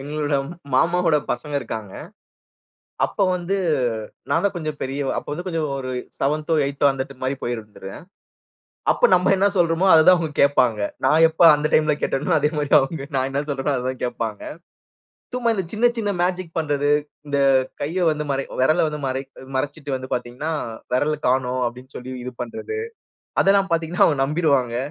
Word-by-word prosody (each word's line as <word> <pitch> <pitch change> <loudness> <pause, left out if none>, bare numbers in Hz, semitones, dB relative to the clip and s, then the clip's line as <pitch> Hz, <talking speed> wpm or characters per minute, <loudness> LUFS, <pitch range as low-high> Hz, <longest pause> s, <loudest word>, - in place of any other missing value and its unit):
எங்களுடைய 145 0 -1 0.4
மாமாவோட 170 +1 +3
பசங்க 145 +4 -3
இருக்கிறாங்க. 110 -5 -6 1.1
அப்ப 205 - -5
வந்து 180 +2 -2 0.7
நான் - - +2
தான் 200 - +1
கொஞ்சம் 155 -3 -4
பெரியவன், 135 +1 -2
அப்ப - - -5
வந்து 175 +5 -6
கொஞ்சம் 165 -3 -1
ஒரு 130 -1 -5 0.3
7 150 +3 0
8 140 +1 -1
அந்த 135 0 -5
மாதிரி 135 +1 -1
போயிருந்துடுவேன். 105 -3 -6 0.9
அப்போ - - +3
நம்ம 180 +2 +4
என்ன 195 +2 +3
சொல்றோமோ, 170 +1 +2
அதைதான் 175 +3 +7
அவங்க 160 -2 -3
கேட்பாங்க. 125 -6 +3 0.3
நான் 155 +4 +5
எப்போ 160 +2 +1
அந்த 150 +1 -1
டைம்ல 155 -1 +3
கேட்டேனோ, 135 +2 -1
அதே 150 +1 +2
மாதிரி 145 -1 -2
அவங்க 135 +2 -3
நான் 130 0 +1
என்ன 140 +1 -1
சொல்றேனோ, 140 +1 -1
அதை 125 - -3
தான் 130 - -6
கேட்பாங்க. 115 -3 -4 0.9
சும்மா 240 -2 +1
இந்த 190 -3 -2
சின்ன, 240 +3 +3
சின்ன 205 -2 0
மேஜிக் 180 -2 -2
பண்றது, 145 -2 0 0.4
இந்த 145 -1 -1 0.4
கையை 175 +5 -1
வந்து 150 0 -2
மறை 135 0 -1 0.2
விரலை 155 +6 +3
வந்து 150 0 -5
மறை 130 +1 -2 0.3
மறைச்சுட்டு 145 0 -3
வந்து 130 0 -8
பார்த்தீங்கனா, 125 +5 -4 0.4
விரல் 150 +3 0
காணோம் 130 0 +1
அப்டின்னு 125 +3 -8
சொல்லி 130 +1 -7
இது 125 +1 -6
பண்றது. 440 - -5 0.6
அதெல்லாம் 195 -1 +3
பார்த்தீங்கன்னா 165 +1 +2
அவங்க 145 -4 +1
நம்பிருவாங்க. 140 -6 +1
145 Hz, 160 wpm, -22 LUFS, 130-165 Hz, 1.1 s, அதைதான்